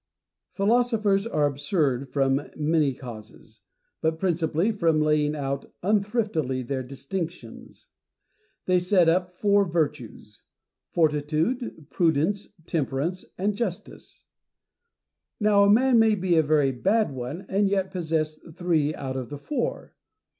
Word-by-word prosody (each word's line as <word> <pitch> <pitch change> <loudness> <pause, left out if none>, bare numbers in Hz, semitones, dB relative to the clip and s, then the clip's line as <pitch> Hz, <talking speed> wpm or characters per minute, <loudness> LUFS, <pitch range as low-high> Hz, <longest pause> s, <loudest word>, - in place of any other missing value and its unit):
Philosophers 215 -1 +2
are 150 -10 +1
absurd 140 -2 0
from 135 +1 0
many 155 -1 +2
causes, 110 -3 -12 0.4
but 160 0 0
principally 170 +2 0
from 165 -7 +1
laying 150 0 +2
out 140 -1 -4
unthriftily 200 - 0
their 135 -1 -2
distinctions. 140 0 -7 0.8
They 185 -1 +3
set 180 -1 +3
up 180 +2 +2
four 200 +2 +3
virtues: 150 - -3 0.5
fortitude, 155 - 0
prudence, 170 +4 +1 0.2
temperance, 160 +3 -2
and 200 +3 0
justice. 200 -5 -6 1.1
Now 205 -2 +4
a - - +4
man 240 +3 +5
may 220 -1 +4
be 185 -3 +1
a 160 - +6
very 150 -3 +2
bad 195 - +1
one, 135 +8 -6
and 200 +1 +1
yet 195 -1 0
possess 160 -3 -2 0.2
three 160 -4 +1
out 130 -1 -5
of 130 -2 -4
the 145 - -6
four. 280 - -4
165 Hz, 120 wpm, -25 LUFS, 145-195 Hz, 1.1 s, a